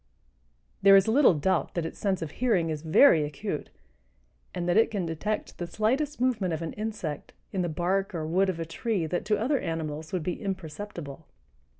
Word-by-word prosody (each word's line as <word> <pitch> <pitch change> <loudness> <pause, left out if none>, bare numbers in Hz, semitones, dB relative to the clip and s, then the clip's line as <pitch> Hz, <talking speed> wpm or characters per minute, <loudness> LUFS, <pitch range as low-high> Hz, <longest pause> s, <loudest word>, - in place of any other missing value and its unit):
There 195 0 +8
is 195 +1 +5
little 230 - +5
doubt 170 +6 0
that 170 -2 -1
its 165 - -7
sense 190 -4 0
of 155 - -6
hearing 195 -9 +1
is 155 -1 -4
very 160 - +6
acute 145 -2 -4 0.8
and 175 -1 -4
that 175 - +2
it 225 - +5
can 200 -5 -2
detect 180 +7 -3
the 175 - -3
slightest 265 - 0
movement 220 -9 +1
of 160 - -5
an 160 - -4
insect 210 -9 -5 0.2
in 190 - 0
the 175 - -1
bark 185 +4 -1
or 160 -2 -2
wood 185 +5 +2
of 175 -3 -3
a 165 - -2
tree 190 +2 -2
that 175 +4 -2
to 210 0 +2
other 265 +5 +1
animals 160 -1 -4
would 185 -4 -2
be 175 +2 -3
imperceptible. 170 -5 -6
180 Hz, 195 wpm, -27 LUFS, 160-210 Hz, 0.8 s, There